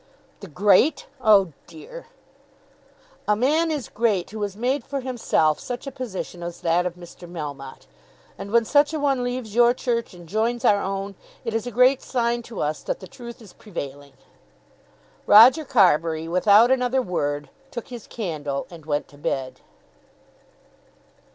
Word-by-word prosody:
"The 200 - -10
great! 200 - +3 0.2
oh 200 -7 +5
dear!" - - -11 1.2
"A 210 - +3
man 300 +9 +2
is 295 -6 -3
great 210 -6 0
who 215 0 -6
has 200 -1 -3
made 255 +3 0
for 275 +2 -4
himself 230 -11 +1
such 245 +1 -6
a 275 - -5
position 220 -9 -6
as 175 0 -7
that 175 +2 +1
of 175 - -6
Mr. 175 0 -13
Melmotte. 145 -5 -7 0.5
And 200 - -8
when 230 +1 +3
such 290 +5 +3
a - - -2
one 275 -3 +1
leaves 245 -3 -4
your 240 +1 +5
Church 235 -6 -2
and 175 -1 -13
joins 230 +5 -1
our 205 -1 +4
own, 195 +1 -4 0.3
it 230 - -2
is 225 +1 -2
a - - -4
great 250 +3 +4
sign 240 -1 -1
to 230 - -5
us 150 +1 -2
that - - -4
the - - -10
Truth 235 -2 -11
is 200 - -15
prevailing." 145 -8 -8 1.1
Roger 250 +9 +8
Carbury, 165 - +2
without 205 +7 +5
another 255 0 +1
word, 145 - -3 0.2
took 245 -1 -7
his 240 -4 -9
candle 150 - -4
and 160 -3 -13
went 145 -1 -1
to 145 - -18
bed. 135 -2 -3
215 Hz, 160 wpm, -23 LUFS, 175-245 Hz, 1.2 s, Roger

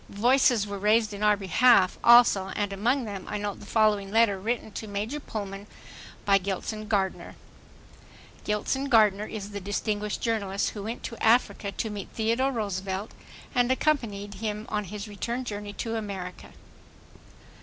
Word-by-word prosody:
Voices 240 0 +3
were 200 -1 -5
raised 215 +1 +2
in 200 - -7
our 210 -1 +4
behalf, 195 0 +4
also, 235 -5 +6
and 205 -1 -1
among 240 +6 0
them 200 -3 -6
I 210 - -2
note 205 -1 -4
the - - -12
following 210 -3 +2
letter 215 -2 +3
written 220 +2 -3
to 220 - -6
Major 210 +8 -3
Pullman 200 -6 -6 0.6
by 195 -1 +5
Gilson 200 +3 -4
Gardner: 195 -3 -1 1.1
The 210 -3 +1
distinguished 205 +1 -2
journalist 200 -4 -1
who 210 - -7
went 225 +4 -5
to 230 - -6
Africa 225 -3 +2
to 220 - -3
meet 205 -1 -6
Theodore 230 +5 +1
Roosevelt 200 -3 -3 0.4
and 245 -1 +2
accompanied 230 -8 0
him 210 +1 -4
on 210 -1 -2
his 205 +3 -7
return 235 +5 -4
journey 205 -2 -5
to 230 +2 -4
America. 195 -4 -6
210 Hz, 145 wpm, -27 LUFS, 200-230 Hz, 1.1 s, also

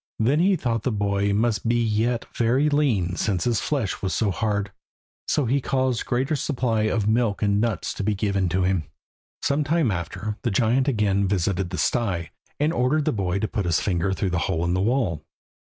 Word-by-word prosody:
Then 130 +7 +2
he 190 +3 +4
thought 120 - -1
the 125 - -1
boy 100 -1 0
must 110 +2 0
be 120 - +2
yet 115 +1 0
very 125 +6 +2
lean 115 - +1
since 95 -5 0
his 120 -2 +1
flesh 135 -10 -2
was 95 -2 -1
so 105 -3 +1
hard, 100 0 -1 0.6
so 145 - +1
he 135 +4 +1
caused 130 -2 0
a - - -6
greater 130 +4 0
supply 125 -7 0
of 105 -1 0
milk 110 -2 +1
and 100 0 +2
nuts 115 -4 -1
to - - -4
be 105 +1 +1
given 100 -2 0
to 95 +2 +1
him. 90 -3 0 0.6
Some 145 +2 +1
time 155 -5 +1
after, 95 +4 -4
the 120 - 0
giant 120 +6 +2
again 100 -6 +1
visited 95 -1 0
the 90 - -5
sty, 95 -9 0 0.3
and 150 +3 +1
ordered 140 +2 +1
the - - +2
boy 95 -3 -1
to 110 - -1
put 105 -4 -2
his 85 -1 +2
finger 95 -1 0
through 95 -1 -1
the 90 - 0
hole 80 +1 0
in 85 - 0
the 95 - +1
wall. 105 - 0
110 Hz, 205 wpm, -24 LUFS, 95-125 Hz, 0.6 s, he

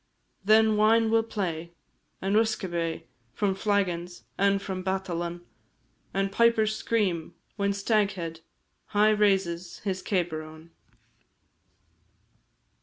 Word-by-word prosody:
Then 215 +1 +5
wine 220 +1 +4
will 225 0 +4
play, 170 -7 -4 0.5
and 195 +2 +1
usquebae 175 -7 0 0.3
From 200 -2 +1
flaggons, 185 -4 -1
and 200 0 +2
from 190 -1 -5
badalan, 175 -2 -3 0.7
And 195 0 -1
pipers 220 0 +3
scream 195 -9 -1 0.2
when 200 -1 0
Staghead 200 -5 0 0.6
High 215 +1 +6
raises 190 -5 +1
his 190 -2 -2
cabar 175 -5 -1
on. 160 +1 -13
195 Hz, 100 wpm, -27 LUFS, 175-215 Hz, 0.7 s, High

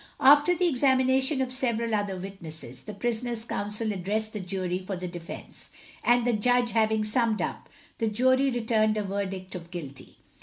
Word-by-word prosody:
After 290 +6 +6
the 360 0 +2
examination 265 0 +2
of 255 - -4
several 235 -3 0
other 205 -2 -1
witnesses, 160 -9 -8
the 210 - -6
prisoner's 235 -1 -2
counsel 210 0 -2
addressed 210 +4 -2
the 210 - -4
jury 185 -1 -2
for 190 +1 -5
the 180 0 -5
defence, 175 -1 -8 0.3
and 240 0 +4
the 245 - +2
judge 245 +2 +2
having 220 -1 +2
summed 220 0 +1
up, - - -4 0.3
the 225 - +1
jury 260 +5 +3
returned 220 -3 +1
a 210 - 0
verdict 195 -1 -4
of 170 -2 -8
Guilty. 150 -6 -8
220 Hz, 165 wpm, -27 LUFS, 190-245 Hz, 0.3 s, After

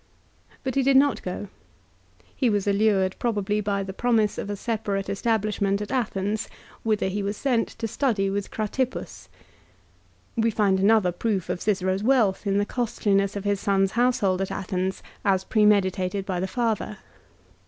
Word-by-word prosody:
But 260 -2 -2
he 275 - +2
did 270 0 +4
not 280 +1 +3
go. 185 +2 -5 0.9
He 255 - +2
was 205 -2 0
allured, 200 -2 +2
probably, 210 -3 0
by 200 -1 -1
the 190 0 -6
promise 220 -1 +1
of - - -4
a 205 - -2
separate 205 -2 -2
establishment 205 -2 0
at 210 - -5
Athens, 215 -4 -1 0.3
whither 215 -3 0
he 200 +2 -2
was 200 +1 -3
sent 250 -5 +1
to 225 - -2
study 220 -5 0
with 200 0 -2
Cratippus. 240 +4 -3 1.1
We 230 -1 +2
find 200 -3 +2
another 200 -2 +4
proof 190 0 -2
of 180 0 -2
Cicero's 190 -2 0
wealth 220 -5 +2
in 195 0 +2
the 205 - +2
costliness 205 -4 0
of 200 - -4
his 205 -1 0
son's 195 -1 +2
household 220 -6 +2
at 195 - -2
Athens, 190 -1 -3 0.2
as 190 -2 +2
premeditated 200 -2 +2
by 185 -3 -2
the 190 - -1
father. 220 -1 -1
205 Hz, 160 wpm, -25 LUFS, 195-225 Hz, 1.1 s, did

